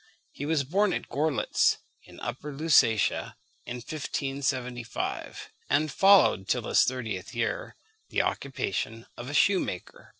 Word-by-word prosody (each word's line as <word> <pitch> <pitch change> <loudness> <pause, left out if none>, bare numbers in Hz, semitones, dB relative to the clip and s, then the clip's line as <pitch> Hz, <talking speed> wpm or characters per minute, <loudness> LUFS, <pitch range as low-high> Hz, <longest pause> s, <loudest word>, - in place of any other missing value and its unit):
He 145 - -6
was 155 -3 +2
born 190 +7 +2
at - - -4
Görlitz, 150 -2 +2 0.3
in - - -14
Upper 130 +5 -5
Lusatia, 140 -8 +3 0.3
in 120 - -4
1575, 130 -3 -3 0.2
and 150 +2 +2
followed 195 - +5
till - - 0
his - - +5
thirtieth 115 -8 -4
year 115 -2 -2 0.3
the - - +1
occupation 115 -4 -3
of 120 +2 -7
a 145 - -4
shoemaker. 185 - 0
135 Hz, 125 wpm, -28 LUFS, 120-155 Hz, 0.3 s, followed